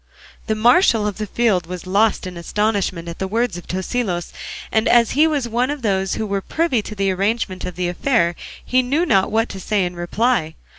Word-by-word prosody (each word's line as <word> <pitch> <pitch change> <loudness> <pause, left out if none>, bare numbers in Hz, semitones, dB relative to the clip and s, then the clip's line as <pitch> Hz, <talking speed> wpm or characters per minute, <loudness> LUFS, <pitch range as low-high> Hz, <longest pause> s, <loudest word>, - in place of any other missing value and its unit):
The 220 - +1
marshal 235 - +4
of 210 0 -3
the 215 - -3
field 200 -7 +1
was 180 0 -7
lost 205 +3 +2
in 185 -1 -6
astonishment 190 -1 -1
at 170 - -7
the 190 - -2
words 225 -1 0
of 175 - -9
Tosilos; 185 -1 -2 0.4
and 220 +1 +2
as 235 -2 +4
he 305 +3 +4
was 290 -6 -1
one 240 +3 0
of 290 -3 -4
those 195 -3 0
who 220 - -2
were 200 -1 -2
privy 315 - 0
to 210 - -8
the 195 -1 +1
arrangement 195 0 -1
of 180 - -5
the 180 -1 -1
affair 175 -1 +1 0.3
he 255 +1 +3
knew 285 +7 0
not 195 - +3
what 225 +2 +1
to 195 - -7
say 195 0 0
in 175 0 -5
reply. 175 -1 0
210 Hz, 210 wpm, -20 LUFS, 185-240 Hz, 0.4 s, marshal